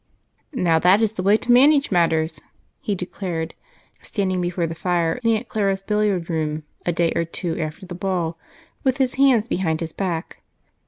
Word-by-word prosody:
"Now, 170 -8 +3
that 180 +5 +5
is 220 -2 +2
the 220 - -4
way 200 +3 +4
to 245 - -1
manage 280 +3 +5
matters," 160 -3 +1 0.4
he 205 - -1
declared, 175 -3 -4 0.5
standing 185 -3 -1
before 175 -1 -1
the 165 - -4
fire 170 +2 0
in 230 - +3
Aunt 230 +3 -4
Clara's 195 -3 -1
billiard 210 -5 0
room 155 -2 -2 0.2
a - - +3
day 170 0 +1
or - - +2
two 165 0 -4
after 160 +4 -5
the 180 - -8
ball, 175 -3 -2 0.4
with 260 -1 +2
his 260 -2 +1
hands 245 -5 +4
behind 165 -7 -1
his 165 -1 -5
back. 175 -3 -4
180 Hz, 175 wpm, -22 LUFS, 165-210 Hz, 0.5 s, that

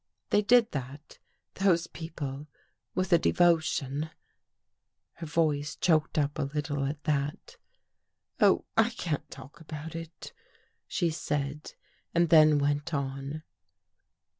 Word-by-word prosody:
They 210 - +4
did 230 +2 +4
that, 140 +2 -7 0.3
those 180 -3 +2
people, 150 -4 -6 0.5
with 185 -1 +1
a 170 - +7
devotion.. 160 -4 +2 0.5
." - - -56
Her 165 - -6
voice 150 -2 0
choked 155 -3 +1
up 145 0 0
a 140 -2 -1
little 145 -2 -2
at 145 +1 -4
that. 145 -1 -2 0.4
" - - -49
Oh, - - +4
I 225 +1 +4
can't 170 - -4
talk 130 +3 -12
about 155 0 -7
it," 165 0 -8 0.5
she 170 -3 0
said 145 -1 -3 0.4
and 170 -1 +3
then 155 -2 +7
went 145 +2 0
on. 140 +2 -4
155 Hz, 125 wpm, -29 LUFS, 145-165 Hz, 0.5 s, a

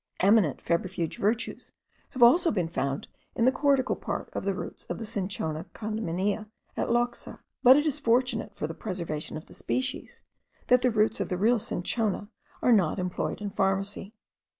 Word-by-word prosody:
Eminent 195 - +4
febrifuge 170 -1 -2
virtues 220 +3 -1 0.4
have 255 - +2
also 330 +9 +6
been 180 -6 0
found 140 -4 -2 0.3
in 230 - +2
the 260 - +6
cortical 275 -2 +2
part - - -5
of - - -4
the 200 - +1
roots - - -6
of - - -4
the 225 - -5
Cinchona 185 -7 -2
condaminea 210 -1 -2 0.3
at - - -1
Loxa; 240 0 0 0.2
but 255 +2 +8
it 295 - +2
is 300 -1 +1
fortunate, 245 -2 +1
for - - -3
the 160 - -4
preservation 170 -7 -4
of 155 - -9
the - - -15
species, 260 +1 -3 0.5
that 250 0 +6
the 250 - +3
roots 220 -1 +2
of - - -2
the 180 - -1
real 230 +5 +3
cinchona 205 +1 -1 0.3
are 245 - +6
not 190 -6 +3
employed 180 +2 -3
in 205 -1 -3
pharmacy. 195 +2 -1
210 Hz, 175 wpm, -28 LUFS, 185-240 Hz, 0.5 s, but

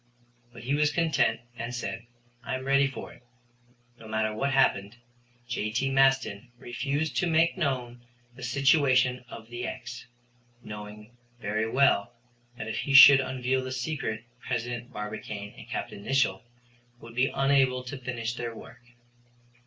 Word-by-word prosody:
But 120 - -12
he 130 +4 -1
was 150 0 +3
content 165 -4 +1
and 120 +1 -5
said: 115 -1 -5 0.4
"I - - -3
am 130 0 -6
ready 140 0 +4
for 135 - -8
it." - - -19 0.8
No 115 - -12
matter 110 0 -1
what 135 +6 -1
happened, 110 -5 +2 0.5
J.T. 120 +3 -1
Maston 135 -5 +2
refused 140 +5 -2
to 175 - +2
make 165 +1 +3
known 125 -8 -2 0.3
the 130 - -13
situation 130 -1 +3
of 115 0 -10
the 120 +1 -4
"x," 125 - -7 0.6
knowing 105 +2 -9 0.2
very 110 +1 -1
well 120 -4 +2 0.4
that 120 - -6
if 110 - -3
he 140 - 0
should 135 0 +11
unveil 130 0 -1
the 130 - -5
secret 125 -4 -3 0.2
President 120 0 -4
Barbicane 105 -1 -6
and - - -13
Capt. - - -4
Nicholl 100 -2 0 0.5
would 115 -1 -12
be 125 +3 +2
unable 135 -2 +2
to 130 +3 -6
finish 120 -3 -4
their 120 -1 -5
work. - - -12
125 Hz, 145 wpm, -28 LUFS, 115-135 Hz, 0.8 s, should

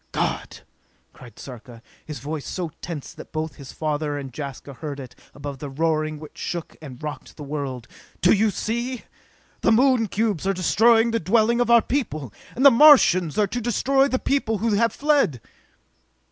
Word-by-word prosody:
"God!" - - -3 0.5
cried 120 -4 -15
Sarka, 120 -2 -11 0.2
his 150 -2 -7
voice 145 +4 -6
so 175 -4 -4
tense 165 -2 -7
that 155 - -12
both 155 -2 -4
his 140 -2 -10
father 150 -1 -2
and 135 -3 -7
Jaska 140 -1 -7
heard 145 +1 -7
it 130 -2 -9 0.2
above 140 -2 -7
the 145 - -6
roaring 155 +1 -1
which 155 - -12
shook 170 -2 -5
and 135 -5 -9
rocked 150 -1 -7
the 150 - -8
world. 140 -5 -5 0.3
"Do 180 - +5
you 220 +1 +3
see? 235 +5 -3 0.6
The - - +3
Moon 245 -1 +4
cubes 205 -3 -1
are 195 - +2
destroying 225 +5 +3
the 230 - 0
dwelling 225 +6 +2
of 240 - 0
our 235 -2 +6
people, 155 - -3 0.2
and 260 - +1
the 280 - +10
Martians 230 - +6
are 210 - +4
to 245 +5 -4
destroy 270 +4 +2
the 260 - 0
people 255 -5 0
who 225 +3 0
have 230 +3 +2
fled!" 280 - +1
175 Hz, 175 wpm, -23 LUFS, 145-230 Hz, 0.6 s, the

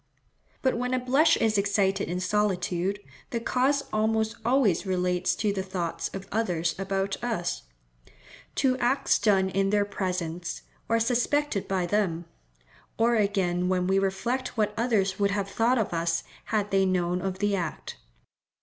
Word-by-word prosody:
But 260 - +2
when 250 +1 0
a - - +1
blush 270 +6 +4
is 220 -2 +2
excited 195 -2 +1
in 180 +1 -2
solitude, 190 -1 0 0.3
the 235 - -2
cause 265 +4 +1
almost 220 0 +1
always 235 -7 +2
relates 180 -2 0
to 210 -2 0
the 195 - -2
thoughts 175 -3 -3
of 195 0 -8
others 175 -7 0
about 195 +2 -2
us—to - - -4
acts 250 +3 +2
done 195 -3 +3
in 195 +1 +1
their 205 0 +2
presence, 180 -3 -3 0.3
or 230 0 +3
suspected 245 0 +1
by 190 -2 0
them; 175 -3 0 0.7
or 235 +1 +3
again 185 -4 +1
when 180 -1 +1
we 190 +1 +3
reflect 230 +7 -2
what 210 -1 +1
others 210 -5 +1
would 200 0 +3
have 200 0 -1
thought 230 +5 +2
of 220 -6 -1
us 165 0 0 0.2
had 210 -2 -1
they 195 0 +3
known 180 -1 0
of 190 0 -3
the 205 +1 +1
act. 170 -5 -4
195 Hz, 150 wpm, -27 LUFS, 180-225 Hz, 0.7 s, blush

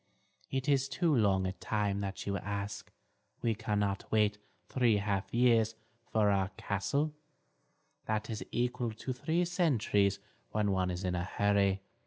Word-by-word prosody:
It 135 +1 -2
is 140 -1 +2
too 160 +1 +2
long 100 -5 +3
a 95 - 0
time 100 0 -1
that 95 -1 -4
you 100 - -1
ask; 100 +2 -5 0.5
we 115 - +2
cannot 105 -3 -1
wait 105 -1 +2 0.3
three 120 -5 +3
half 100 -1 -1
years 115 -2 +3 0.4
for 105 -2 +3
our 95 -1 +1
castle; 140 +10 -1 0.9
that 110 0 -1
is 110 -2 -4
equal 120 -1 -1
to 130 +4 -4
three 160 +7 0
centuries 120 - +2 0.4
when 105 -1 +1
one 95 -1 +1
is 90 +1 -3
in 90 -1 0
a 90 -1 -1
hurry. 100 0 +2
105 Hz, 150 wpm, -32 LUFS, 100-120 Hz, 0.9 s, long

